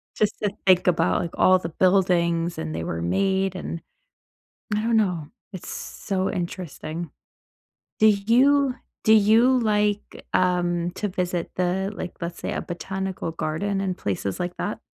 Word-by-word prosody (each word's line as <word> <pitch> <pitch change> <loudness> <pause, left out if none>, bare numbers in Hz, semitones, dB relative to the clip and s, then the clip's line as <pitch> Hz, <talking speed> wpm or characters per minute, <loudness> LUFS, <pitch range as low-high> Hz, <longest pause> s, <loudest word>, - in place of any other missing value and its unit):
just 210 - +1
to 205 - 0 0.2
think 185 -1 +5
about, 175 +1 +2
like, 170 - -4
all 185 0 +5
the 165 - -5
buildings 175 -2 +2
and 80 0 -4
they 80 - -3
were 85 0 -3
made, 190 - +1
and 170 -2 -5 0.9
I 210 - 0
don't 230 0 +2
know, 180 -8 0 0.3
it's 185 - -7
so 190 -2 -3
interesting. 170 -2 -5 0.9
Do 220 - +6
you 250 +6 +4 0.3
do 220 - +6
you 220 +5 +5
like, 210 -3 0
um, 175 -1 +1
to 210 +3 -3
visit 180 -2 -2
the, 185 +2 0
like, 180 - -5
let's 170 0 -5
say, - - -3
a - - -2
botanical 190 0 -4
garden 165 +5 -2
and 185 -2 -2
places 100 0 -2
like 180 0 -3
that? 210 - -3
185 Hz, 155 wpm, -24 LUFS, 170-205 Hz, 0.9 s, Do